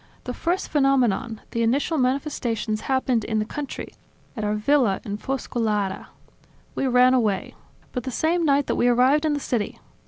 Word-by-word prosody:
The 250 Hz, -, -4 dB
first 345 Hz, +8 st, -1 dB
phenomenon, 255 Hz, -6 st, +1 dB
the 230 Hz, -, -1 dB
initial 280 Hz, +7 st, +1 dB
manifestations 250 Hz, -5 st, -1 dB
happened 260 Hz, -4 st, +1 dB
in 220 Hz, 0 st, -2 dB
the 215 Hz, -, 0 dB
country, 285 Hz, +5 st, -6 dB, 0.4 s
at 220 Hz, -, -4 dB
our 210 Hz, 0 st, 0 dB
villa 220 Hz, -2 st, +2 dB
in 205 Hz, 0 st, -3 dB
Foscolara... 220 Hz, -7 st, -2 dB, 0.7 s
We 270 Hz, -, -1 dB
ran 250 Hz, 0 st, +5 dB
away. 215 Hz, -6 st, 0 dB, 0.4 s
But 250 Hz, -, -3 dB
the -, -, -2 dB
same 330 Hz, +7 st, +1 dB
night 285 Hz, -2 st, +3 dB
that -, -, -1 dB
we 245 Hz, -, +3 dB
arrived 255 Hz, +5 st, +4 dB
in 305 Hz, -, +2 dB
the 290 Hz, -, -1 dB
city 240 Hz, -6 st, -2 dB
250 Hz, 165 wpm, -24 LUFS, 220-280 Hz, 0.7 s, ran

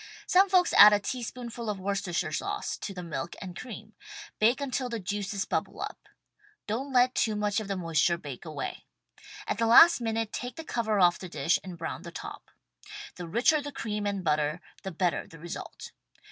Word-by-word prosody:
Some 380 Hz, +2 st, +4 dB
folks 365 Hz, -2 st, +4 dB
add 210 Hz, 0 st, +10 dB
a 205 Hz, -, +4 dB
teaspoonful 235 Hz, 0 st, -5 dB
of 205 Hz, -2 st, -3 dB
Worcester 195 Hz, -1 st, -2 dB
shire 170 Hz, -, -1 dB
sauce -, -, -3 dB
to -, -, -6 dB
the 180 Hz, -2 st, -7 dB
milk 165 Hz, -1 st, -5 dB
and 180 Hz, -2 st, -8 dB
cream. 220 Hz, -2 st, -9 dB, 0.5 s
Bake 230 Hz, +5 st, +4 dB
until 265 Hz, -2 st, -2 dB
the 230 Hz, -1 st, -3 dB
juices 200 Hz, +1 st, -3 dB
bubble -, -, -3 dB
up. -, -, -7 dB, 0.6 s
Don't 250 Hz, +7 st, -3 dB
let 250 Hz, 0 st, +4 dB
too 220 Hz, -2 st, +1 dB
much 210 Hz, 0 st, 0 dB
of 215 Hz, -, -6 dB
the 195 Hz, -1 st, -2 dB
moisture 165 Hz, -1 st, +1 dB
bake 145 Hz, -7 st, -8 dB
away. 155 Hz, -4 st, -6 dB, 0.6 s
At 210 Hz, -, -2 dB
the 230 Hz, -, +2 dB
last 290 Hz, +6 st, +8 dB
minute 225 Hz, -1 st, -2 dB
take 245 Hz, 0 st, -5 dB
the 325 Hz, -, -7 dB
cover 220 Hz, -7 st, -1 dB
off 175 Hz, -2 st, +4 dB
the 185 Hz, -, -8 dB
dish 170 Hz, -, +1 dB
and 185 Hz, -3 st, -8 dB
brown 165 Hz, -1 st, -5 dB
the 170 Hz, -, -8 dB
top. -, -, -9 dB, 0.7 s
The 175 Hz, -1 st, -6 dB
richer 245 Hz, -, +3 dB
the 290 Hz, 0 st, -6 dB
cream 210 Hz, -5 st, -3 dB
and 200 Hz, -2 st, -2 dB
butter 150 Hz, 0 st, +1 dB, 0.2 s
the 190 Hz, -, -5 dB
better 175 Hz, 0 st, -1 dB
the 165 Hz, -, -13 dB
result. 170 Hz, +2 st, -8 dB
205 Hz, 195 wpm, -28 LUFS, 175-235 Hz, 0.7 s, add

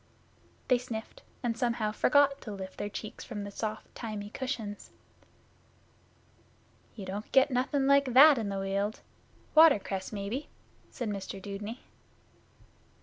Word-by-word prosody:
They 250 Hz, -2 st, +4 dB
sniffed, 230 Hz, -3 st, -7 dB, 0.2 s
and 235 Hz, -2 st, 0 dB
somehow 235 Hz, -3 st, 0 dB
forgot 280 Hz, +5 st, +3 dB
to 215 Hz, -, -7 dB
lift 190 Hz, -2 st, -8 dB
their 205 Hz, -, -2 dB
cheeks 210 Hz, +1 st, -7 dB
from 210 Hz, -4 st, -6 dB
the 200 Hz, -, -6 dB
soft 215 Hz, +1 st, -4 dB
thymy 210 Hz, -3 st, -6 dB
cushions. 230 Hz, -6 st, -4 dB, 2.1 s
'You 205 Hz, -4 st, -7 dB
don't 200 Hz, +3 st, -6 dB
get 270 Hz, +1 st, +5 dB
nothing 265 Hz, +2 st, +1 dB
like 280 Hz, -2 st, +4 dB
that 285 Hz, 0 st, +9 dB
in 215 Hz, -3 st, -2 dB
the 195 Hz, -, -3 dB
Weald. 195 Hz, +2 st, -2 dB, 0.5 s
Watercress, 210 Hz, -12 st, +4 dB
maybe?' 210 Hz, +7 st, -4 dB, 0.4 s
said 240 Hz, -4 st, -4 dB
Mr 195 Hz, -1 st, -5 dB
Dudeney. 205 Hz, +5 st, -6 dB
220 Hz, 130 wpm, -30 LUFS, 205-255 Hz, 2.1 s, that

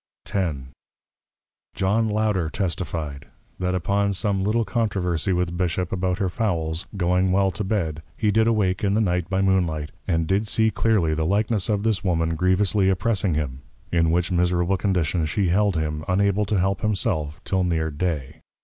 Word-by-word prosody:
X. 90 Hz, -7 st, -1 dB, 1.2 s
John 110 Hz, +4 st, +1 dB
Louder 105 Hz, -6 st, 0 dB
testify'd, 85 Hz, -7 st, -3 dB, 0.3 s
That 90 Hz, 0 st, 0 dB
upon 100 Hz, +3 st, +1 dB
some 100 Hz, -1 st, 0 dB
little 110 Hz, +3 st, +1 dB
Controversy 95 Hz, -6 st, -1 dB
with 90 Hz, -1 st, 0 dB
Bishop 90 Hz, 0 st, -1 dB
about 95 Hz, -1 st, -1 dB
her 100 Hz, -2 st, 0 dB
Fowls, 85 Hz, -5 st, -1 dB
going 90 Hz, +1 st, +2 dB
well 95 Hz, 0 st, +3 dB
to 105 Hz, -, -4 dB
Bed, 85 Hz, -7 st, -1 dB, 0.2 s
he 105 Hz, -2 st, +2 dB
did 110 Hz, +1 st, +3 dB
awake 105 Hz, -4 st, +1 dB
in 100 Hz, 0 st, +2 dB
the -, -, +2 dB
Night 90 Hz, -4 st, 0 dB
by 95 Hz, 0 st, +1 dB
Moonlight, 85 Hz, -6 st, +1 dB, 0.2 s
and 80 Hz, -3 st, +1 dB
did 100 Hz, +5 st, 0 dB
see 110 Hz, +1 st, +2 dB
clearly 105 Hz, -10 st, +1 dB
the 80 Hz, +1 st, -1 dB
likeness 105 Hz, +2 st, +1 dB
of 105 Hz, -1 st, 0 dB
this 110 Hz, -3 st, 0 dB
Woman 80 Hz, -3 st, +1 dB
grievously 95 Hz, +3 st, +2 dB
oppressing 95 Hz, -2 st, +1 dB
him; 70 Hz, -3 st, -3 dB, 0.3 s
in 85 Hz, -1 st, +2 dB
which 85 Hz, +2 st, +1 dB
miserable 90 Hz, +1 st, +2 dB
condition 90 Hz, -4 st, 0 dB
she 95 Hz, +2 st, 0 dB
held 100 Hz, +1 st, +2 dB
him, 75 Hz, -1 st, -2 dB
unable 100 Hz, +2 st, +2 dB
to 100 Hz, +1 st, 0 dB
help 95 Hz, +1 st, 0 dB
himself, 95 Hz, -8 st, -1 dB
till 95 Hz, -1 st, 0 dB
near 80 Hz, -3 st, 0 dB
Day. 75 Hz, -4 st, -3 dB
95 Hz, 165 wpm, -23 LUFS, 85-100 Hz, 1.2 s, well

